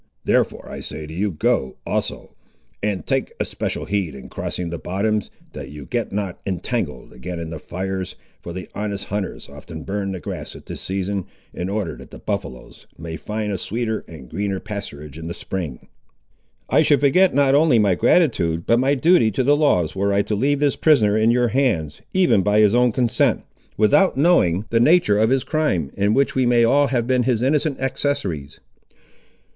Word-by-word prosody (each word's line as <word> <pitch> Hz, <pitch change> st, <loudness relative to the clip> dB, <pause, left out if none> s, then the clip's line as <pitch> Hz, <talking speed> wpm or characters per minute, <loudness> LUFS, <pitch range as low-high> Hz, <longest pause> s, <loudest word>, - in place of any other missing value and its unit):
Therefore -, -, +1 dB
I -, -, -7 dB
say 80 Hz, -, -6 dB
to 80 Hz, -, -9 dB
you, 100 Hz, +5 st, 0 dB
go, 75 Hz, -6 st, 0 dB
also; -, -, -3 dB, 0.5 s
and 100 Hz, -3 st, -2 dB
take 135 Hz, -1 st, -1 dB
especial -, -, -3 dB
heed, 95 Hz, -7 st, -2 dB
in 65 Hz, -, -10 dB
crossing 85 Hz, -2 st, -4 dB
the 85 Hz, -, -4 dB
bottoms, 105 Hz, +3 st, -1 dB, 0.2 s
that -, -, -7 dB
you 75 Hz, -1 st, -9 dB
get 120 Hz, -2 st, -2 dB
not 100 Hz, -3 st, -3 dB
entangled 95 Hz, -4 st, -3 dB
again 85 Hz, +8 st, -6 dB
in 80 Hz, -1 st, -5 dB
the 80 Hz, -, -6 dB
fires, 95 Hz, +3 st, -4 dB, 0.3 s
for 85 Hz, -, -7 dB
the 90 Hz, -1 st, -6 dB
honest 100 Hz, -1 st, -3 dB
hunters 100 Hz, -1 st, -4 dB
often 75 Hz, +3 st, -10 dB
burn 100 Hz, 0 st, -3 dB
the 95 Hz, -, -5 dB
grass -, -, -6 dB
at -, -, -12 dB
this -, -, -6 dB
season, 95 Hz, 0 st, -2 dB, 0.3 s
in 90 Hz, +2 st, -4 dB
order 100 Hz, -3 st, -2 dB
that -, -, -12 dB
the -, -, -11 dB
buffaloes 95 Hz, -12 st, -6 dB
may 80 Hz, 0 st, -6 dB
find 105 Hz, +3 st, -3 dB
a 95 Hz, -, -2 dB
sweeter 110 Hz, +2 st, -2 dB
and 80 Hz, -5 st, -10 dB
a -, -, -14 dB
greener 100 Hz, +5 st, -2 dB
pasturage 80 Hz, -9 st, -7 dB
in 80 Hz, -, -6 dB
the 85 Hz, -, -5 dB
spring." 85 Hz, -10 st, -5 dB, 0.8 s
"I -, -, +4 dB
should 145 Hz, -, +3 dB
forget 170 Hz, +4 st, +4 dB
not 140 Hz, -1 st, +4 dB
only 145 Hz, -3 st, +5 dB
my 105 Hz, -3 st, +4 dB
gratitude, 85 Hz, -, +2 dB
but 115 Hz, -, +3 dB
my 135 Hz, +3 st, +2 dB
duty 160 Hz, -4 st, +4 dB
to 110 Hz, +5 st, -1 dB
the 145 Hz, +3 st, +4 dB
laws, 95 Hz, -, +2 dB
were 100 Hz, +1 st, +1 dB
I 100 Hz, 0 st, +2 dB
to 105 Hz, -, -3 dB
leave 135 Hz, +7 st, +1 dB
this 145 Hz, -1 st, +2 dB
prisoner 115 Hz, -10 st, +4 dB
in 110 Hz, +1 st, +3 dB
your 120 Hz, 0 st, +3 dB
hands, 105 Hz, -, 0 dB
even 180 Hz, -, +3 dB
by 105 Hz, +2 st, +2 dB
his 105 Hz, -1 st, +5 dB
own 125 Hz, 0 st, +4 dB
consent, 120 Hz, 0 st, +1 dB, 0.3 s
without 120 Hz, -, +4 dB
knowing 110 Hz, -, +3 dB
the 115 Hz, -, +3 dB
nature 120 Hz, -6 st, +4 dB
of 110 Hz, +1 st, +3 dB
his 130 Hz, 0 st, +2 dB
crime, 120 Hz, -, 0 dB
in 100 Hz, +2 st, +2 dB
which 140 Hz, 0 st, +2 dB
we 130 Hz, -2 st, +2 dB
may 120 Hz, -1 st, +4 dB
have 115 Hz, -, +4 dB
all 135 Hz, -3 st, +3 dB
been 125 Hz, +1 st, +2 dB
his 120 Hz, -1 st, +1 dB
innocent 150 Hz, +1 st, +1 dB
accessaries." 105 Hz, -, -2 dB
105 Hz, 195 wpm, -21 LUFS, 90-130 Hz, 0.8 s, only